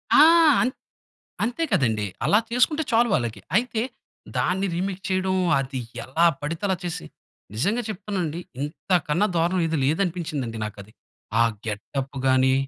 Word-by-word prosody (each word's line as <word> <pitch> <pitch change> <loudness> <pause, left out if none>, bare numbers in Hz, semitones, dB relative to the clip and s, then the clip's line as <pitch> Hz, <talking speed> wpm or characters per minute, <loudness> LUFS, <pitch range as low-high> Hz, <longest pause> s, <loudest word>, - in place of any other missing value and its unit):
ఆ! 290 - +9 0.4
అన్ 250 - +2 0.7
అంతే 245 +8 -1
కదండి. 110 - +2 0.2
అలా 210 - +5
చేసుకుంటే 275 +6 +2
చాలు 235 +1 +4
వాళ్ళకి. 120 -2 -1 0.2
అయితే, 230 -1 +1 0.5
దాన్ని 190 +2 +1
రీమేక్ 185 +2 -2
చేయడం 185 0 +1 0.2
అది 135 -1 -4 0.2
ఎలా 160 +7 +2
పడితే 160 +4 -4
అలా 190 - +1
చేసి. 165 - -4 0.5
నిజంగా 205 - 0
చెప్తాను 205 -1 -4
అండి 160 +2 -4 0.2
ఇంతకన్నా 170 +3 0
దారుణం 175 +3 +2
ఏది 160 -1 -1
లేదనిపించింది 155 - -1
నాకది. 105 0 -8 0.5
ఆ - - +7 0.2
గెటప్పు 135 +6 -4
గాని 130 0 +4
170 Hz, 135 wpm, -24 LUFS, 130-195 Hz, 0.7 s, ఆ